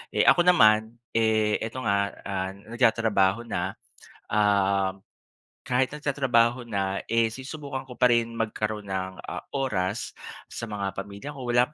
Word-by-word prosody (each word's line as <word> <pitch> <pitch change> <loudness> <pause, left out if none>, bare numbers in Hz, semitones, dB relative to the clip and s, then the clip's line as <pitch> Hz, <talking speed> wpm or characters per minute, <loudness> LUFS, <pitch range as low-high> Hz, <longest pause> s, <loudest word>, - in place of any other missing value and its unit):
Eh, - - +4
ako 175 0 +5
naman, 110 -9 +5 0.2
eh, 110 -2 +2
ito 115 +4 -5
nga, 100 -1 +1
ah, 95 -1 -3
nagtatrabaho 110 -1 +2
na, 115 - -3 0.6
um, 100 -2 +2 0.6
kahit 125 +1 +2
nagtatrabaho 130 -5 +1
na, 100 -2 -1
eh, 115 -1 +2
sinusubukan 135 0 -6
ko 125 - -10
pa - - +4
rin 115 0 0
magkaroon 110 -1 -2
ng, 95 -1 -4
ah, - - -5 0.2
oras 105 -6 -1 0.3
sa 115 - -7
mga 100 -2 -3
pamilya 100 +8 -7
ko 140 - -9
wala 120 +5 +3
110 Hz, 140 wpm, -26 LUFS, 100-125 Hz, 0.6 s, ako